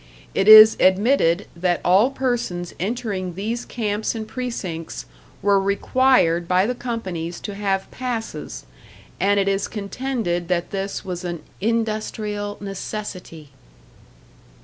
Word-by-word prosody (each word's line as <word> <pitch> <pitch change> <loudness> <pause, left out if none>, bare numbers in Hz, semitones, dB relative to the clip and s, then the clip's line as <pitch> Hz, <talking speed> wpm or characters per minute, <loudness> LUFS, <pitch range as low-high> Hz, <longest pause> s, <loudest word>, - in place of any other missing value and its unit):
It 195 - +1
is 215 0 +10
admitted 190 -2 +3
that 175 0 0
all 195 +8 +5
persons 240 -10 -2
entering 195 -4 -3
these 225 +5 -3
camps 215 -1 -2
and 220 -1 -5
precincts 200 -10 -5 0.4
were 200 -1 +4
required 200 -4 +2
by 185 +2 +3
the 245 - 0
companies 190 -9 -5
to 205 - -5
have 195 -1 -1
passes, 225 - -5 0.5
and 200 +2 +3
it 195 - +1
is 195 0 0
contended 210 -4 -3
that 175 -1 -1
this 195 +1 -4
was 180 -1 -5
an 175 -2 -5 0.2
'industrial 215 -2 -2
necessity.'" 195 -6 -7
200 Hz, 120 wpm, -22 LUFS, 180-225 Hz, 0.5 s, is